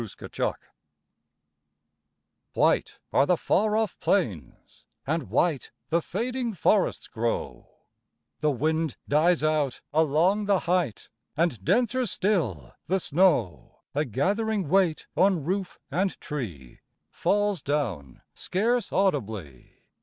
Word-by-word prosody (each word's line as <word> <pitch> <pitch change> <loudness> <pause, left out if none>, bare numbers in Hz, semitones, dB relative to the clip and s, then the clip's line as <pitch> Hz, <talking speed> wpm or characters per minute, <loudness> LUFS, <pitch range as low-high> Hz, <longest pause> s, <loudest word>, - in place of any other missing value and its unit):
SNOW 110 - -4 2.0
White - - +2 0.2
are 140 - +4
the 180 - +3
far 215 +5 +1
off 220 -2 -1
plains, 100 - -2 0.2
and 160 +3 -2
white 160 -7 +1 0.2
The 170 +1 +2
fading 235 +5 -3
forests 200 +2 +1
grow; 115 +1 -3 0.7
The 150 - +2
wind 155 +2 0
dies 155 +3 +3
out 155 -4 0
along 160 +7 +3
the 200 -2 +2
height, 175 - -1 0.3
And 160 - 0
denser 245 - +2
still 140 - -1
the 190 +3 +1
snow, 150 - +1
A 145 - +1
gathering 195 - -1
weight 180 -4 +2
on 185 -5 +3
roof 185 +4 -2
and 185 +6 -1
tree, 90 - -6 0.3
Falls 205 -4 +1
down 110 - -3
scarce 230 +6 0
audibly. 110 - -2
165 Hz, 110 wpm, -26 LUFS, 135-195 Hz, 2.0 s, are